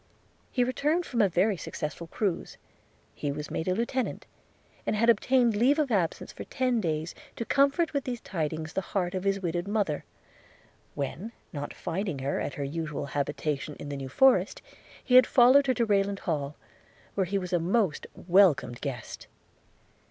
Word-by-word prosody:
He 250 - +1
returned 300 +7 0
from 240 -3 0
a 200 - +4
very 190 +4 +2
successful 165 0 -5
cruize; 190 0 -2 0.6
he 145 - -3
was 150 +1 -6
made 160 - -3
a 185 - +2
lieutenant, 235 +3 -2 0.6
and - - -1
had 230 +2 +5
obtained 240 +1 +2
leave 255 +8 +4
of 295 -5 +1
absence 180 -6 -1
for - - -7
ten 255 -3 0
days, 160 -2 -2 0.2
to 230 - -4
comfort 280 +6 +2
with 280 -2 0
these 245 -2 -3
tidings 160 -5 -4
the 195 - 0
heart 180 -2 -2
of 185 0 -3
his 195 0 +1
widowed 175 +2 -2
mother; 200 -8 0 0.9
when, 155 - -4 0.2
not 145 -1 -4
finding 180 -2 -3
her 135 +1 -2
at - - -3
her 145 - -3
usual 150 0 -3
habitation 145 +1 -2
in 145 - -8
the 145 - -4
New 135 -1 -6
Forest, 265 - +3 0.4
he 250 - -2
had 255 0 +8
followed 260 +3 +6
her 260 - +4
to 235 - +2
Rayland 200 -1 +1
Hall, 150 -4 -2 0.6
where 190 -2 0
he 200 +3 0
was 180 -2 -4
a 175 - +3
most 185 0 0
welcome 185 -7 +4
guest. 120 -1 -6
190 Hz, 175 wpm, -28 LUFS, 155-235 Hz, 0.9 s, had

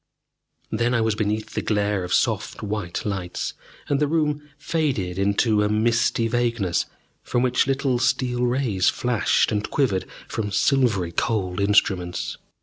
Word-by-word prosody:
Then 120 +3 +1
I 115 - +2
was 110 -1 +2
beneath 105 +1 -2
the - - -1
glare 105 -2 0
of 90 - -6
soft - - 0
white 105 -4 -3
lights, 95 -4 -3 0.3
and 140 - +1
the 150 - +2
room 150 -1 0 0.2
faded 135 - -1
into 105 +2 +2
a 105 - +1
misty 115 +1 +2
vagueness 115 -6 0 0.3
from 120 - 0
which 125 +1 +2
little 135 -2 +1
steel 125 -1 +1
rays 120 -7 +2
flashed 120 -3 +1
and 105 -1 -1
quivered 120 -10 0 0.2
from 105 -2 -3
silvery 105 -6 +2
cold 95 0 -1
instruments. 95 -3 +1
110 Hz, 145 wpm, -23 LUFS, 100-125 Hz, 0.3 s, I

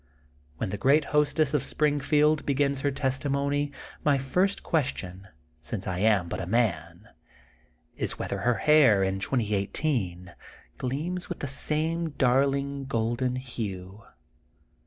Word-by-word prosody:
When 110 -5 -3
the 105 - -4
great 140 +3 +4
hostess 150 0 +2
of 150 - +2
Springfield 150 +1 +2
be 140 - 0
gins 140 -1 +1
her 145 - +1
testimony 140 +2 -1 0.3
my 145 -2 +3
first 180 +10 0
question, 100 - -2 0.3
since 95 +4 -5
I 90 -1 -3
am 100 -4 +3
bnt - - -4
a 85 - -5
man, 90 -4 -1 0.9
is - - -2
whether - - -3
her 120 0 +2
hair 135 -11 +5
in 95 0 -1
2018 100 - -1 0.5
gleams 165 +8 -3
with 175 - -4
the 140 - -2
same 155 +3 -1
daYling 140 +1 +1
golden 120 +1 -1
hue. 105 -6 -6
135 Hz, 130 wpm, -27 LUFS, 105-145 Hz, 0.9 s, hair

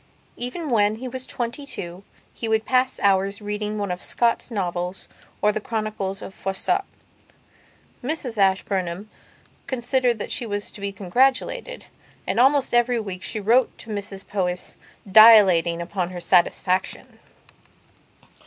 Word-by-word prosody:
Even 275 +5 -5
when 210 -2 +3
he 255 +4 -7
was 260 +1 -6
twenty 240 +4 -4
two 180 -9 -7 0.3
he 230 - -5
would 220 0 +1
pass 255 0 +1
hours 195 0 +2
reading 210 0 -4
one 200 -3 -2
of 180 - -4
Scott's 235 0 0
novels 180 -4 -3 0.4
or 210 - +5
the 215 0 -3
Chronicles 215 -3 -3
of - - -8
Froissart. 195 0 -1 1.2
Mrs 265 -4 -3
Ashburnham 190 0 0 0.6
considered 250 -1 0
that 210 - -6
she 235 - -2
was 205 -1 -4
to 205 - -12
be 200 0 -2
congratulated, 260 - 0 0.4
and - - -1
almost 270 +1 +3
every 240 0 +3
week 190 -4 -6
she 215 - -4
wrote 235 +5 +2
to 225 - -10
Mrs 200 -1 -6
Powys, 180 -3 -3 0.3
dilating 190 -5 +7
upon 180 0 -3
her 180 -1 -7
satisfaction. 180 +1 +1
210 Hz, 135 wpm, -23 LUFS, 190-240 Hz, 1.2 s, dilating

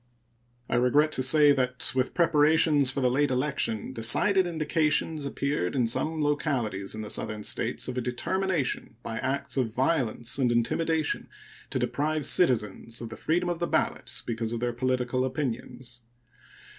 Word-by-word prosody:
I - - 0
regret 145 +5 +3
to 130 - -1
say 145 +3 +5
that 125 -2 +1
with 130 0 -1
preparations 155 -3 +4
for 135 +1 -1
the 125 -1 +2
late 145 +3 +2
election 130 -4 -1
decided 175 - +3
indications 155 -1 0
appeared 140 -8 -2
in 125 -3 +2
some 155 +7 -1
localities 125 -10 -1
in 110 - -5
the 105 - -7
Southern 105 -1 -2
States - - -1
of 125 - -3
a - - -2
determination, 140 +3 -2
by 115 -1 -4
acts 140 +1 -3
of 125 -4 0
violence 130 -3 0
and 125 -3 +2
intimidation, 155 +7 0 0.4
to - - -2
deprive 155 0 -1
citizens 115 - +2
of 115 - -7
the 110 - -8
freedom 175 +3 -1
of 175 -1 -2
the 170 - -1
ballot - - -1
because 115 -1 -3
of 120 - -3
their 120 0 -2
political 130 0 -1
opinions. 125 -2 -5
130 Hz, 155 wpm, -27 LUFS, 120-155 Hz, 0.4 s, say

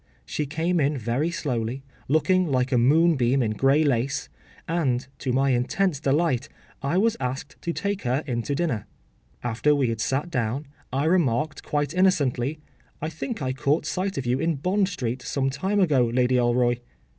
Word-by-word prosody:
She 150 - -3
came 165 +4 0
in 145 0 +1
very 125 +7 0
slowly, 130 -5 -3 0.2
looking 180 +5 +3
like 130 -2 +1
a 125 - +3
moonbeam 135 -2 +4
in 110 - 0
grey 135 +8 +3
lace, 135 -1 0 0.4
and, 135 -7 0
to 130 - -2
my 135 +2 +2
intense 140 +7 +1
delight, 140 -2 +1 0.3
I 140 +6 0
was 225 +3 +3
asked 135 +2 -5
to 170 - -2
take 200 +3 -2
her 130 +4 0
in 120 -4 -1
to 140 +4 -2
dinner. 140 -10 -1 0.6
After 125 +5 +2
we 135 -4 +1
had 115 -1 -2
sat 135 +8 -1
down, 130 +1 -1 0.3
I 135 +3 0
remarked 155 -4 +1
quite 145 0 -1
innocently, 155 -7 +2 0.4
“I 155 - -3
think 160 - -5
I 130 0 -1
caught 140 +4 0
sight 190 +1 -2
of 135 - -2
you 125 +2 +1
in 165 +1 +1
Bond 185 +7 +1
Street 130 - -3
some 135 +1 -1
time 190 +9 0
ago, 145 -10 +3
Lady 125 +2 +1
Alroy. 120 0 +2
140 Hz, 175 wpm, -25 LUFS, 125-165 Hz, 0.6 s, moonbeam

